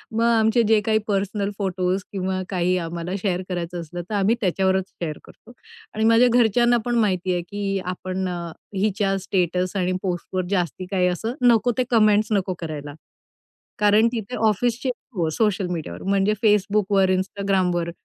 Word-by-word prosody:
मग 230 - +2
आमचे 230 0 +3
जे 220 0 +5
काही 220 -1 +3
पर्सनल 200 0 -1
फोटोज 185 -1 -1
किंवा 190 -1 -2
काही 180 -1 +1
आम्हाला 170 0 -4
शेअर 185 -3 0
करायचं 175 -1 -4
असलं, 175 +2 -6
तर - - -4
आम्ही 205 +3 +2
त्याच्यावरच 190 0 +1
शेअर 155 -3 -5
करतो - - -17 0.4
आणि 220 - -1
माझ्या 230 +2 +6
घरच्यांना 240 0 +4
पण 240 -1 0
माहिती 185 -5 +1
आहे, 175 - -1
की 195 +2 -3
आपण 185 +1 -3
अ, 175 - -3 0.4
हिच्या 195 0 0
स्टेटस 180 0 -1
आणि 185 -1 0
पोस्टवर 185 0 -2
जास्ती 185 -2 -1
काही 185 -2 +2
असं 200 +6 -2
नको 245 -1 +4
ते 255 - +3
कमेंट्स 215 -2 +4
नको 195 -3 +1
करायला. 150 -3 -6 0.9
कारण 210 +2 +5
तिथे 235 0 -4
ऑफिसचे 235 +4 +1 0.3
हो. 170 -4 0
सोशल 205 0 0
मीडियावर 165 -3 -5
म्हणजे 195 +1 +2
Facebookवर, 205 -2 +3
Instagramवर 185 -3 0
195 Hz, 155 wpm, -23 LUFS, 180-215 Hz, 0.9 s, माझ्या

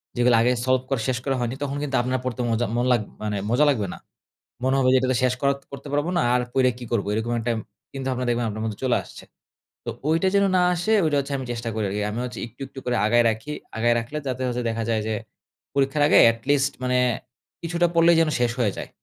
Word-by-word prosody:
যেগুলো 120 -1 +4
আগে 120 +2 +3
সলভ 130 0 +3
করা 135 -4 0
শেষ 130 -2 0
করা 135 -1 +1
হয়নি 120 +1 -2
তখন 140 0 -3
কিন্তু 140 -2 -2
আপনার 130 +1 -1
পড়তে 125 0 -2
মজা 115 +1 +1
মন 120 - +1
লাগ 120 -3 +3 0.2
মানে 105 -1 -2
মজা 125 +6 +4
লাগবে 110 -9 0
না। - - -10 0.7
মনে 130 +1 +2
হবে 130 -1 +3
যে 130 - +6
এটা 130 0 +1
শেষ 125 0 +2
কর 140 - +3 0.2
করতে 140 - -8
পারব 145 +1 +1
না - - +2
আর 125 - +2
পইরে 130 -1 +3
কি 125 - -8
করবো 110 -4 0
এরকম 110 +2 -1
একটা 120 +1 -1 0.4
কিন্তু 135 -1 -5
আপনার 125 0 -3
দেখবেন 120 0 0
আপনার 110 +1 -5
মধ্যে 110 -2 -4
চলে 125 - +3
আসছে। - - -13 0.6
তো - - -3 0.2
ঐটা 165 +4 +2
যেন 200 - +4
না 180 - +4
আসে 175 +6 0
ঐটা 150 -2 +2
হচ্ছে 140 +1 -4
আমি 130 - -5
চেষ্টা 120 -1 -4
করি 110 -2 -1
আরকি। 105 +2 -2
আমি 115 - -4
হচ্ছে 125 - -7
একটু, 120 +4 -19
একটু 135 - -10
করে 125 - 0
আগায় 120 +2 +4
রাখি 110 +7 -4 0.3
আগায় 120 +1 +3
রাখলে 120 +6 -6
যাতে 130 0 -3
হচ্ছে 125 0 -2
দেখা 115 0 -2
যায় 110 -1 +1
যে 110 - -1 0.6
পরীক্ষার 140 +1 +1
আগে - - +5
at 115 - -10
least 145 0 +3
মানে 125 0 +1 0.6
কিছুটা 170 +1 +1
পড়লেই 170 0 +6
যেন 160 - +2
শেষ 120 -1 +2
হয়ে 105 -5 +2
যায়। - - -6
125 Hz, 240 wpm, -24 LUFS, 115-140 Hz, 0.7 s, যে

